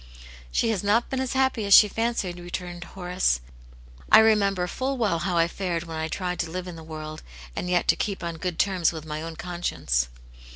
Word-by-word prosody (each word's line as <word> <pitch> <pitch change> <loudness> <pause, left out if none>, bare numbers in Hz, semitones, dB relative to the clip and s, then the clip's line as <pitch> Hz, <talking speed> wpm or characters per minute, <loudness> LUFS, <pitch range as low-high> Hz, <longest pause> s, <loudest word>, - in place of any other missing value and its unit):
" 60 0 -16
She 225 - +1
has 205 -4 -2
not 215 +4 +2
been 265 - -1
as 260 0 -2
happy 265 -4 +1
as 200 -1 +7
she 210 - +9
fancied," 210 -5 -2
re 175 0 -9
turned 175 -1 -5
Horace. 180 - 0 0.4
" - - -22 0.3
I - - +10
remember 200 -4 +4
full 265 +9 -2
well 210 -8 +1
how 175 +1 -1
I 165 0 +4
fared 175 -2 -3
when 165 -2 -6
I 160 0 -1
tried 180 +2 -3
to 170 - -1
live 185 +2 -5
in 180 - -7
the 165 - -10
world, 155 -1 -7 0.3
and 180 - -3
yet 180 -1 +2
to - - +6
keep 200 -3 -3
on 170 -1 -4
good 175 0 -3
terms 185 -4 +2
with 160 -2 -7
my 155 0 -4
own 165 0 -6
conscience." 170 - -1
180 Hz, 225 wpm, -25 LUFS, 165-205 Hz, 0.4 s, I